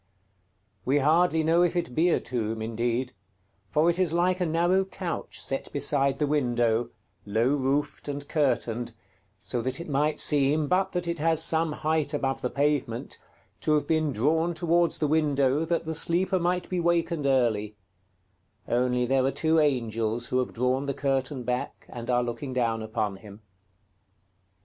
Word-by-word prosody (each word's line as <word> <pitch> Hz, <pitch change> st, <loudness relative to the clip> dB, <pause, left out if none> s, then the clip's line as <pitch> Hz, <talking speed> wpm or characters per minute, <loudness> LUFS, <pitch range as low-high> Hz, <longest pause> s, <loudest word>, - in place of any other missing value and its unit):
We 135 Hz, +6 st, +2 dB
hardly 160 Hz, +3 st, +3 dB
know 165 Hz, +2 st, +3 dB
if 175 Hz, 0 st, +2 dB
it 170 Hz, -8 st, -2 dB
be 165 Hz, +6 st, +3 dB
a -, -, +2 dB
tomb 115 Hz, -3 st, -3 dB
indeed; 120 Hz, +3 st, -2 dB, 0.6 s
for 150 Hz, -, +2 dB
it 175 Hz, +1 st, +2 dB
is 180 Hz, -4 st, +1 dB
like 180 Hz, +2 st, +1 dB
a 180 Hz, -, +1 dB
narrow 175 Hz, +4 st, +2 dB
couch 185 Hz, -3 st, -5 dB
set 135 Hz, -, -4 dB
beside 140 Hz, -1 st, +1 dB
the 150 Hz, -, +1 dB
window, 120 Hz, -5 st, +1 dB, 0.3 s
low 110 Hz, +4 st, +1 dB
roofed 140 Hz, +1 st, -1 dB
and 145 Hz, 0 st, -5 dB
curtained, 120 Hz, -5 st, -1 dB, 0.5 s
so 120 Hz, +4 st, -3 dB
that 130 Hz, +4 st, -3 dB
it 170 Hz, -, -7 dB
might 150 Hz, +1 st, 0 dB
seem, 145 Hz, +1 st, +3 dB
but 190 Hz, +4 st, +1 dB
that 180 Hz, -1 st, -2 dB
it 170 Hz, -1 st, -2 dB
has 160 Hz, 0 st, +3 dB
some 160 Hz, 0 st, +2 dB
height 155 Hz, -1 st, -1 dB
above 135 Hz, -2 st, -2 dB
the 125 Hz, -, -1 dB
pavement, 140 Hz, -5 st, -1 dB, 0.4 s
to 155 Hz, -, +1 dB
have 150 Hz, -, 0 dB
been 155 Hz, -2 st, +1 dB
drawn 160 Hz, +9 st, +1 dB
towards 170 Hz, 0 st, +1 dB
the 150 Hz, -, 0 dB
window, 145 Hz, -1 st, +2 dB
that 165 Hz, 0 st, -1 dB
the 160 Hz, -, -3 dB
sleeper 175 Hz, +4 st, +2 dB
might 180 Hz, +1 st, -1 dB
be 185 Hz, -, -2 dB
wakened 170 Hz, -3 st, 0 dB
early; 110 Hz, -6 st, +1 dB, 0.9 s
only 125 Hz, +1 st, +1 dB
there 130 Hz, +1 st, +2 dB
are 135 Hz, -, +2 dB
two 160 Hz, +4 st, +1 dB
angels 115 Hz, -5 st, 0 dB
who 130 Hz, -, +1 dB
have 125 Hz, -, -2 dB
drawn 130 Hz, +3 st, -1 dB
the 140 Hz, -, -2 dB
curtain 135 Hz, -1 st, -1 dB
back, 125 Hz, +1 st, -4 dB
and 120 Hz, 0 st, -8 dB
are 125 Hz, 0 st, +2 dB
looking 120 Hz, +3 st, -5 dB
down 115 Hz, -3 st, 0 dB
upon 110 Hz, -3 st, -3 dB
him. 105 Hz, +1 st, -14 dB
140 Hz, 170 wpm, -27 LUFS, 125-160 Hz, 0.9 s, hardly